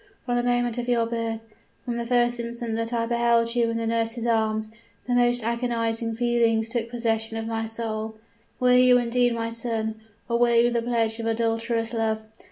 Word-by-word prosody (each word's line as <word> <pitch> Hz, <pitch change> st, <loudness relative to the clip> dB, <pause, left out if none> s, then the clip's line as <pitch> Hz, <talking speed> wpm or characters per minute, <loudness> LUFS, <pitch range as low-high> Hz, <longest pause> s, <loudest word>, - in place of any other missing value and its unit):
From 245 Hz, -, 0 dB
the 240 Hz, -, +2 dB
moment 245 Hz, -1 st, 0 dB
of 240 Hz, -, -4 dB
your 235 Hz, -2 st, +2 dB
birth 230 Hz, -1 st, -3 dB, 0.4 s
from 240 Hz, -1 st, -2 dB
the 235 Hz, 0 st, -3 dB
first 240 Hz, 0 st, +2 dB
instant 235 Hz, -1 st, -3 dB
that 230 Hz, +1 st, -2 dB
I 230 Hz, -1 st, 0 dB
beheld 235 Hz, 0 st, +2 dB
you 235 Hz, -1 st, +2 dB
in 230 Hz, -, -1 dB
the 230 Hz, -, -2 dB
nurse's 230 Hz, +1 st, -1 dB
arms 220 Hz, -1 st, 0 dB, 0.3 s
the 250 Hz, -, -1 dB
most 245 Hz, -1 st, +3 dB
agonizing 230 Hz, -1 st, -1 dB
feelings 230 Hz, -2 st, +2 dB
took 230 Hz, 0 st, -3 dB
possession 225 Hz, -2 st, -1 dB
of 225 Hz, -, -3 dB
my 225 Hz, 0 st, -2 dB
soul. 220 Hz, -1 st, -3 dB, 0.4 s
Were 250 Hz, 0 st, +4 dB
you 250 Hz, 0 st, +6 dB
indeed 245 Hz, 0 st, +1 dB
my 230 Hz, 0 st, -3 dB
son? 225 Hz, -1 st, -3 dB, 0.3 s
or 235 Hz, -1 st, 0 dB
were 240 Hz, -1 st, +4 dB
you 235 Hz, +1 st, +4 dB
the 235 Hz, -1 st, 0 dB
pledge 230 Hz, -1 st, 0 dB
of 230 Hz, -, -3 dB
adulterous 230 Hz, 0 st, -1 dB
love? 220 Hz, -1 st, -1 dB
230 Hz, 190 wpm, -25 LUFS, 225-240 Hz, 0.4 s, you